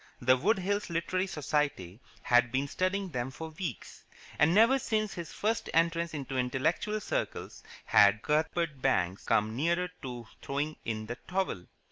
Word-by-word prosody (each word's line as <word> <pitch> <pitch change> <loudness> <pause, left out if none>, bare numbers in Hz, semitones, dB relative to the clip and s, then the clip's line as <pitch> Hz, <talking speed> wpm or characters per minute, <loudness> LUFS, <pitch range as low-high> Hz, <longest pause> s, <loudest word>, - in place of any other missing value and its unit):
The 130 +1 +5
Wood 195 - +2
Hills 200 +2 -1
Literary 185 +3 -1
Society 145 - -2 0.2
had 120 -1 +4
been 135 +3 0
studying 185 +4 -1
them 125 -4 -3
for 160 +4 -7
weeks, 155 - -6 0.4
and 150 +3 +5
never 230 +8 +5
since 215 -4 -1
his 170 -2 -6
first 225 +2 -1
entrance 170 0 +2
into 135 -2 -3
intellectual 155 +12 0
circles - - -4 0.2
had 105 +2 +5
Cuthbert 155 -1 0
Banks 95 -8 +1
come 110 +1 +1
nearer 170 +6 +1
to 125 -3 -6 0.2
throwing 145 +3 -2
in 110 -1 -3
the 120 +2 -6
towel. 185 - -2
155 Hz, 150 wpm, -30 LUFS, 125-185 Hz, 0.4 s, The